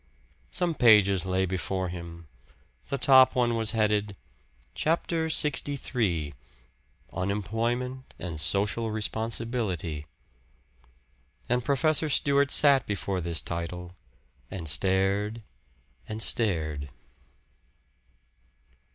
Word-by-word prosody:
Some 175 -2 -1
pages 105 - +4
lay 95 0 +1
before 95 0 -3
him; 85 -1 -9 0.6
the 140 - -1
top 130 -2 +6
one 120 -2 +2
was 110 -1 -1
headed: 105 -2 0 0.6
"Chapter 165 0 0
LXIII 125 - 0 0.8
Unemployment 115 +7 -3
and 85 -4 -5
Social 105 +5 +1
Responsibility." 110 -7 -3 1.4
And 125 0 0
Professor 155 +3 +2
Stewart 140 0 +2
sat 140 -2 +5
before 100 -2 -2
this 85 -1 -2
title, 85 +1 -5 0.6
and 85 -4 -6
stared, 100 +6 0 0.7
and 110 0 -5
stared. 80 -11 0
105 Hz, 85 wpm, -27 LUFS, 90-125 Hz, 1.4 s, top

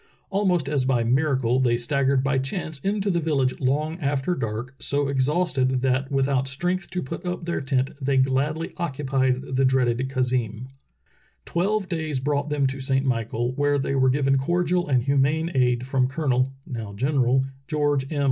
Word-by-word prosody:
Almost 185 -7 +1
as 140 -2 +1
by 130 -2 +2
miracle 130 -1 +2
they 120 -2 +2
staggered 135 +2 +1
by 135 0 +1
chance 150 +2 -4
into 200 +4 0
the 170 - +1
village 140 -5 0
long 150 +6 0
after 145 +2 0
dark, 120 -2 -4
so 145 0 0
exhausted 135 -2 +1
that 130 +1 0
with 135 -1 +2
out 135 -1 +1
strength 175 +7 -2
to 180 -1 -3
put 130 - -6
up 180 -1 -3
tlieir 170 -5 -2
tent 135 -1 0
they 135 0 +2
gladly 135 +5 0
occupied 135 -5 0
the 135 - +3
dreaded 130 -3 +2
khazeem. 125 -2 -1 0.8
Twelve 195 +3 0
days 160 -6 -2
brought 145 +2 -1
them 145 -2 +1
to 135 +1 -2
Saint 135 0 0
Michael, 120 -1 -1
where 145 +1 +1
the)^ 135 0 -1
were 130 - +4
given 135 0 +2
cordial 175 +4 0
and 130 -4 +2
humane 140 +5 +1
aid 125 -2 +2
from 130 -1 +1
Colonel 135 -2 0
(now 110 -5 -6
General) 130 +1 +2 0.2
George 145 -3 0
M. 150 - -2
135 Hz, 170 wpm, -24 LUFS, 130-150 Hz, 0.8 s, were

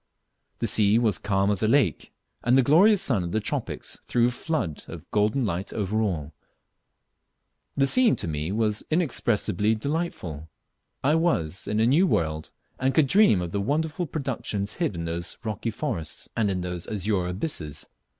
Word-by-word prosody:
The - - -2
sea 105 0 +4
was 110 -5 +1
calm 100 0 +1
as 100 - -1
a 110 - +2
lake, 135 +1 +1 0.3
and 125 +2 +4
the 135 - +5
glorious 185 - +5
sun 105 -9 +1
of 85 - -5
the 110 - +2
tropics 105 - -4
threw 120 0 +3
a - - -4
flood 120 - -3
of - - -9
golden 105 +5 +1
light 95 -1 -3
over 105 +1 -1
all. 80 -8 -2 1.4
The 135 - +3
scene 245 - +6
was - - -6
to - - -4
me 75 +2 -3 0.4
inexpressibly 115 - +1
delightful. 110 - -4 0.5
I 145 +3 +3
was 155 - 0
in 105 - 0
a 110 - +4
new 155 +10 +4
world, 80 - -1 0.3
and 130 +1 +1
could 155 - +5
dream 140 - +4
of 85 - -5
the 100 - -1
wonderful 160 - -1
productions 120 -9 -3
hid 100 - 0
in 85 0 -4
those 85 +1 -4
rocky 110 0 -3
forests, 105 - -4
and 110 -3 +1
in 95 -2 -1
those 90 -1 -5
azure 100 -3 -1
abysses. 90 - -4
105 Hz, 170 wpm, -25 LUFS, 90-140 Hz, 1.4 s, scene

